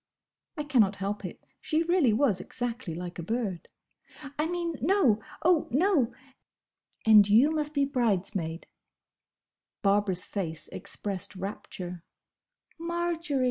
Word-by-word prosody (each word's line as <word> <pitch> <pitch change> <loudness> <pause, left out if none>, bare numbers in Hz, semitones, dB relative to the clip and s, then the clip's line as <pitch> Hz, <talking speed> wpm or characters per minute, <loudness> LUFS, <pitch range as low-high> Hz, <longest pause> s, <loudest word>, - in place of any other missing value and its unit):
(I 300 - -2
cannot 230 -9 +3
help 200 +2 -3
it: - - -8 0.2
she 320 -1 +1
really 340 -7 +3
was 215 -4 +2
exactly 240 -8 -4
like 175 0 -6
a - - -2
bird!) 205 -2 -3 0.7
"I 305 - +2
mean, 345 -1 -2
No! 285 - +3 0.2
oh, 340 -2 +4
no!" 290 - +2 0.9
"And 210 -2 +7
you 240 +9 +6
must 305 -1 -2
be 280 -1 +3
bridesmaid!" 195 -10 -1 1.2
Barbara's 200 -2 +3
face 160 -6 -4
expressed 195 -1 -4
rapture. 180 -2 -6 0.8
"Marjory!" 335 -3 -1
230 Hz, 115 wpm, -28 LUFS, 195-305 Hz, 1.2 s, And